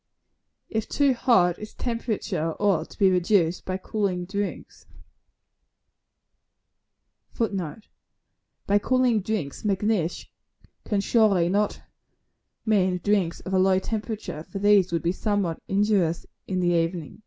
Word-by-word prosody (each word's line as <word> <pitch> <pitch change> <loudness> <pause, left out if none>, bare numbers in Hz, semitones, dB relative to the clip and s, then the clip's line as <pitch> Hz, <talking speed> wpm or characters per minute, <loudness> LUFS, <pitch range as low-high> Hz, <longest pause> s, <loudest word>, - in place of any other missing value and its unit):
If 220 0 -3
too 280 -2 +3
hot, 185 -8 +3
its 215 - -9
temperature 215 -8 -2
ought 200 -5 +1
to - - -15
be 195 -2 +4
reduced 180 -1 +2
by 185 0 -2
cooling 190 -2 -2
drinks, 200 +2 -5 2.5
[Footnote: 200 -4 -3 0.8
By 205 +1 +3
cooling 250 -1 +2
drinks. 190 -8 -3
Macnish 200 -4 0 0.6
cannot 200 -2 0
surely 195 -7 +3 1.1
mean 190 -4 +2
drinks 195 -5 +1
of 185 - -6
a 190 - +3
low 190 0 +4
temperature, 215 -4 -4
for 180 - -8
these 200 -2 +4
would 170 -1 -1
be 170 - +2
somewhat 195 -4 -1
injurious 195 -4 +1 0.2
in 185 -1 -1
the 175 - +2
evening. 165 0 -1
195 Hz, 120 wpm, -25 LUFS, 175-215 Hz, 2.5 s, be